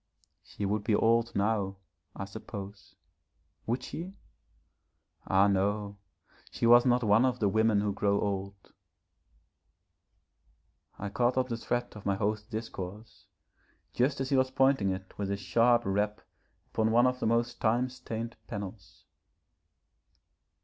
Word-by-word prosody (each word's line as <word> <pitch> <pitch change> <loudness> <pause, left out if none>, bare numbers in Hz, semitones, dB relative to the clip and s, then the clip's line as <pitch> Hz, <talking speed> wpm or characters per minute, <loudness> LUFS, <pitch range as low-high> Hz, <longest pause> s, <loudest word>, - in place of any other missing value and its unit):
She 100 - -6
would 105 +1 -1
be 110 -1 +2
old 115 +2 +2
now, 100 -1 0 0.4
I 100 - -5
suppose. 100 -1 -9 0.7
Would 120 +3 -1
she? 180 +8 -7 1.1
Ah 95 +2 +4
no, 100 +1 0 0.5
she - - -2
was 120 +2 +7
not 125 0 +3
one 110 +2 +4
of 130 -1 +1
the 105 - +2
women 110 +1 +3
who 105 -1 -1
grow 100 0 +1
old.... 100 -1 -4 2.2
I 100 - -4
caught 120 +4 +1
up 130 0 +1
the 115 - -1
thread 120 +1 -2
of 105 - -7
my 100 - +2
host's 105 +1 -2
discourse 110 -2 -7 0.7
just 130 +3 +1
as 135 0 -3
he - - +4
was 130 0 +3
pointing 130 -6 +3
it 95 0 -5
with 100 -1 -2
a 100 - -1
sharp 115 +6 +3
rap 105 +2 -1 0.5
upon 110 0 +1
one 120 +2 +4
of 125 0 +1
the - - 0
most 115 +1 0
time 120 +3 +2
stained 115 -2 -6
panels. 100 -2 -8
110 Hz, 140 wpm, -30 LUFS, 100-120 Hz, 2.2 s, was